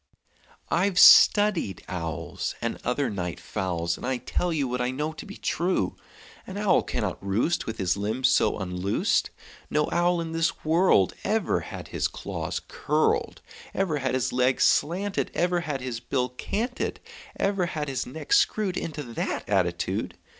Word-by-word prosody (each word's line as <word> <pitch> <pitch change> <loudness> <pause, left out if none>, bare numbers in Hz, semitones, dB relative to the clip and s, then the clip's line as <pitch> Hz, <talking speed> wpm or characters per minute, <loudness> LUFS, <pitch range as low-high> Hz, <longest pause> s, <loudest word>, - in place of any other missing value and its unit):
"I've 180 +2 +1
studied 200 - +6
owls, 85 -2 -4
And - - -3
other 130 +2 0
night 90 -6 -4
fowls, 85 -2 -2
And - - -7
I 130 -1 0
tell 170 +8 -2
you 145 -5 0
What 125 0 -2
I 125 - 0
know 150 +5 -3
to 155 - -9
be - - -9
true: 180 +3 0 0.5
An 190 - -6
owl 205 -2 +3
cannot - - -3
roost 110 - 0
With 110 0 -4
his 90 -2 +1
limbs 110 +6 0
so - - +3
unloosed; 90 0 0 0.4
No 150 0 +1
owl 175 0 +2
in 165 -1 -4
this 165 -1 -1
world 160 - +4
Ever 220 0 +1
had - - -8
his - - 0
claws - - -4
curled, 450 0 0 0.3
Ever 170 -6 0
had 130 -1 -1
his 130 - -1
legs 125 +1 +2
slanted, 190 +7 +1
Ever 175 0 +1
had 150 -6 -3
his 125 -3 -4
bill 125 0 -1
canted, 225 - -3 0.4
Ever 195 -3 +1
had 155 -3 -3
his 135 -2 -3
neck 160 - -4
screwed 215 - +2
Into 150 -2 -4
that 120 -3 -4
attitude. - - -1
145 Hz, 160 wpm, -26 LUFS, 115-180 Hz, 0.5 s, studied